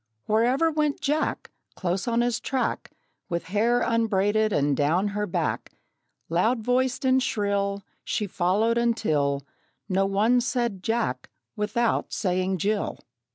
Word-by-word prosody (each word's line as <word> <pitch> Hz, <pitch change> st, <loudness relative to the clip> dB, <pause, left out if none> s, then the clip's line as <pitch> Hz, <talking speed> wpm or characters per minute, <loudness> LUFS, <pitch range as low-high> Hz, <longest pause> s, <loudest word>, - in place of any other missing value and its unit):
Wherever 245 Hz, +9 st, +2 dB
went 300 Hz, -2 st, 0 dB
Jack, 300 Hz, +1 st, -1 dB, 0.2 s
Close 185 Hz, +2 st, -2 dB
on 235 Hz, 0 st, +2 dB
his 240 Hz, -1 st, 0 dB
track, 265 Hz, -1 st, -2 dB, 0.4 s
With 170 Hz, -1 st, -2 dB
hair 235 Hz, +4 st, +3 dB
unbraided 215 Hz, -1 st, +2 dB
and 145 Hz, -5 st, +2 dB
down 165 Hz, +9 st, +1 dB
her 210 Hz, +1 st, -2 dB
back, 175 Hz, -, -2 dB, 0.5 s
Loud 220 Hz, +8 st, +1 dB
voiced 255 Hz, +3 st, +1 dB
and 260 Hz, 0 st, +4 dB
shrill, 200 Hz, -3 st, -1 dB, 0.2 s
She 210 Hz, -, -1 dB
followed, 205 Hz, +5 st, +1 dB
until 150 Hz, -12 st, +1 dB, 0.4 s
No 195 Hz, 0 st, +1 dB
one 220 Hz, +5 st, +3 dB
said 235 Hz, -5 st, -1 dB
"Jack" 225 Hz, -, -1 dB, 0.3 s
without 225 Hz, +2 st, 0 dB
saying 185 Hz, -1 st, 0 dB
"Jill." 205 Hz, +4 st, -1 dB
215 Hz, 125 wpm, -26 LUFS, 190-240 Hz, 0.5 s, and